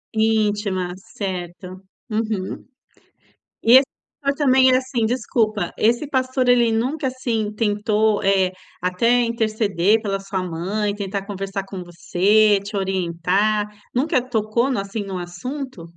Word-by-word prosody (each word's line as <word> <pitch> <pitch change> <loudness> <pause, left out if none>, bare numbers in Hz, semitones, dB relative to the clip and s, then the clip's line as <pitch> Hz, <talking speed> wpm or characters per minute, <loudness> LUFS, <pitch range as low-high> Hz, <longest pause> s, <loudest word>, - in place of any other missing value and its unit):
Íntima, 210 -4 +1
certo. 185 -3 -6 0.3
Uhum. 215 -3 -3 1.0
E 235 +2 +6
esse 265 0 +6 0.3
pastor 280 0 0
também 260 -3 +5
é - - +5
assim, 255 -4 -1
desculpa, 225 -3 0
esse 240 +6 +2
pastor 260 -1 0
ele 240 -2 +4
nunca, 265 +6 -1
assim, 230 -5 -2
tentou, 210 0 +1
eh, 190 -1 +3 0.3
até 230 +7 +2
interceder 215 -3 +1
pela 195 -2 -1
sua 195 -1 -4
mãe, 190 +5 -2
tentar 200 -1 -4
conversar 195 -1 -4
com 195 -2 -7
você, 200 +5 +3
te 205 +1 -5
orientar, 190 +2 0 0.3
nunca 260 0 +2
tocou 235 0 0
no 245 - 0
assim, 200 +2 -4
no 190 -2 -5
assunto? 250 - -6
215 Hz, 130 wpm, -21 LUFS, 195-235 Hz, 1.0 s, E